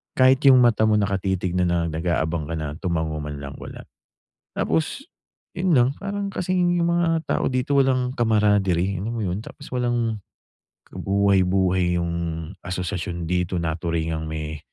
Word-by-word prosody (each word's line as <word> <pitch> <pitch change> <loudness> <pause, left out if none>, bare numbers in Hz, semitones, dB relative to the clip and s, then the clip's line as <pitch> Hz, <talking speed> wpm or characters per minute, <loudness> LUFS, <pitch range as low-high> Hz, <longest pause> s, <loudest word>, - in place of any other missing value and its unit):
kahit 130 +1 +4
yung 130 -2 +8
mata 120 -3 +4
mo, 105 -1 +4
nakatitig 95 -2 -1
na 90 - +2
na 85 -1 +1
nag-aabang 80 0 -1
ka - - -6
na, 75 -1 -4
tumango 80 -4 -1
man 75 -1 -6
lang, 70 0 -7
wala. - - -9 0.7
Tapos 80 0 -1 0.5
yun 180 0 0
lang, 125 +1 +5
parang 200 0 -3
kasing 180 -1 +1
yung 170 - +2
mga 165 -1 +1
tao - - 0
dito 130 +2 +1
walang 130 -2 +2
camaraderie, 100 -5 +2
alam 115 +4 -3
mo 110 - -2
yun? 90 +2 -2
Tapos - - -11
walang 120 -3 0 0.7
kabuhay-buhay 95 -2 +2
yung 85 0 -2 0.5
asosasyon 90 -1 -3
dito, 90 +1 -1
naturingang 80 -1 -2
may, 75 -1 -5
95 Hz, 145 wpm, -23 LUFS, 85-125 Hz, 0.7 s, yung